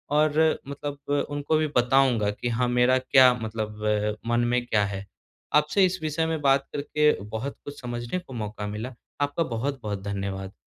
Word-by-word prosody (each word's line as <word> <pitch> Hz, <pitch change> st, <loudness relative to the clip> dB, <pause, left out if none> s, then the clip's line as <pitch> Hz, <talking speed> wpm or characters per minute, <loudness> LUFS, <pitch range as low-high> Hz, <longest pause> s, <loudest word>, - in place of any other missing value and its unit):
और 150 Hz, 0 st, +4 dB, 0.4 s
मतलब 145 Hz, 0 st, -5 dB
अ, -, -, +3 dB, 0.2 s
उनको 145 Hz, +2 st, +1 dB
भी 155 Hz, -, +1 dB
बताऊँगा 125 Hz, -3 st, +3 dB
कि 120 Hz, +3 st, -4 dB
हाँ, 125 Hz, +2 st, +1 dB
मेरा 125 Hz, +1 st, +4 dB
क्या 130 Hz, -1 st, +6 dB
मतलब 110 Hz, -2 st, -5 dB
अ, 105 Hz, 0 st, +1 dB
मन 120 Hz, 0 st, +2 dB
में 125 Hz, 0 st, +1 dB
क्या 105 Hz, -3 st, +2 dB
है? 100 Hz, 0 st, -5 dB, 0.5 s
आपसे 150 Hz, +6 st, +4 dB
इस 185 Hz, 0 st, -1 dB
विषय 155 Hz, +1 st, 0 dB
में 160 Hz, -1 st, -1 dB
बात 135 Hz, -1 st, +3 dB
करके 150 Hz, +1 st, +2 dB, 0.2 s
बहुत 115 Hz, +6 st, -4 dB
कुछ 145 Hz, -1 st, -8 dB
समझने 120 Hz, +7 st, -3 dB
को 155 Hz, -7 st, -12 dB
मौका 105 Hz, -2 st, -4 dB
मिला। 110 Hz, +5 st, -5 dB, 0.3 s
आपका 145 Hz, +3 st, +1 dB
बहुत-बहुत 115 Hz, -6 st, -3 dB
धन्यवाद। 95 Hz, -1 st, -4 dB
125 Hz, 175 wpm, -26 LUFS, 105-145 Hz, 0.5 s, क्या